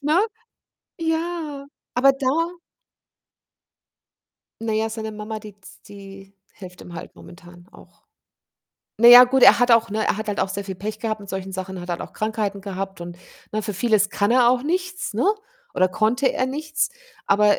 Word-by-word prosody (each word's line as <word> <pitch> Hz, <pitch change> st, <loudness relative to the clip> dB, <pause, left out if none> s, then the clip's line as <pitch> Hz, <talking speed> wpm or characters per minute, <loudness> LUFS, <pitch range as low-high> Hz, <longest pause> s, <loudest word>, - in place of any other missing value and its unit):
ne? 315 Hz, +9 st, +2 dB, 0.7 s
Ja, 325 Hz, -3 st, -3 dB, 0.3 s
aber 270 Hz, +3 st, +5 dB
da? 270 Hz, -1 st, -4 dB, 2.4 s
Na 220 Hz, -1 st, -1 dB
ja, 220 Hz, +1 st, 0 dB
seine 220 Hz, 0 st, -5 dB
Mama, 215 Hz, +1 st, -6 dB
die 210 Hz, -2 st, -13 dB
z 195 Hz, -, -16 dB
die 195 Hz, -1 st, -13 dB, 0.2 s
hilft 180 Hz, -2 st, -12 dB
ihm 175 Hz, -, -12 dB
halt 165 Hz, -, -9 dB
momentan 175 Hz, -1 st, -15 dB
auch. -, -, -19 dB, 0.9 s
Na 235 Hz, +2 st, +6 dB
ja, 245 Hz, +1 st, +11 dB
gut, 265 Hz, +1 st, +1 dB
er -, -, +8 dB
hat 245 Hz, 0 st, +3 dB
auch 230 Hz, -1 st, +4 dB
ne, 215 Hz, +1 st, -1 dB
er -, -, +1 dB
hat 210 Hz, -1 st, -3 dB
auch -, -, 0 dB
sehr 200 Hz, +1 st, -5 dB
viel 190 Hz, -1 st, -6 dB
Pech 215 Hz, +3 st, -6 dB
gehabt 215 Hz, -2 st, -3 dB
mit 200 Hz, -, -12 dB
solchen 190 Hz, 0 st, -5 dB
Sachen, 185 Hz, 0 st, -6 dB
hat 175 Hz, -, -7 dB
halt 175 Hz, -, -3 dB
auch -, -, -9 dB
Krankheiten 210 Hz, -2 st, -3 dB
gehabt 195 Hz, -2 st, -6 dB
und 175 Hz, 0 st, -9 dB, 0.3 s
ne, 215 Hz, -, -1 dB
für 210 Hz, -2 st, -4 dB
vieles 210 Hz, -1 st, +2 dB
kann 205 Hz, +1 st, 0 dB
er 245 Hz, -1 st, +5 dB
auch 250 Hz, +1 st, +2 dB
nichts, 365 Hz, +4 st, -3 dB
ne, -, -, 0 dB, 0.5 s
oder 185 Hz, -, +3 dB
konnte 225 Hz, +8 st, +1 dB
er 255 Hz, -, 0 dB
nichts, 310 Hz, +3 st, -2 dB, 0.4 s
aber, 205 Hz, +1 st, +4 dB
215 Hz, 175 wpm, -22 LUFS, 195-255 Hz, 2.4 s, ja